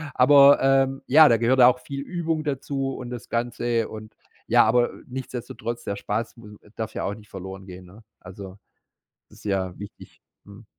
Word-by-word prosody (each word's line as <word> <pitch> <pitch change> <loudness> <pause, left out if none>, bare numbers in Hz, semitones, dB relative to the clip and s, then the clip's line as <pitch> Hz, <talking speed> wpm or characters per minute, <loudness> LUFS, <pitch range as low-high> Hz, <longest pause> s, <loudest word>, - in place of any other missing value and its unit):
aber, 140 +2 +7
ähm, 135 0 +2
ja, 155 +1 +7
da 115 - +4
gehört 125 +3 +2
auch 125 +1 +6
viel 140 +2 -7
Übung 165 -1 -3
dazu 135 -1 -3
und 125 -1 -8
das 120 -1 -8
Ganze 120 -1 -1
und 110 0 -10 0.3
ja, - - +5
aber 120 +2 +2 0.2
nichtsdestotrotz, 120 -2 -6
der 100 - -4
Spaß 110 +3 -4
m 105 -2 -13 0.2
darf 110 -1 -6
ja - - -3
auch 100 - -2
nicht 105 0 -14
verloren 95 0 -9
gehen, 90 0 -11
ne? 100 +5 -17 0.2
Also, 95 +1 -11 0.7
das - - -18
ist - - -18
ja 95 -3 -2
wichtig, 100 0 -12 0.3
mhm. 100 +2 -15
120 Hz, 180 wpm, -24 LUFS, 105-135 Hz, 0.7 s, aber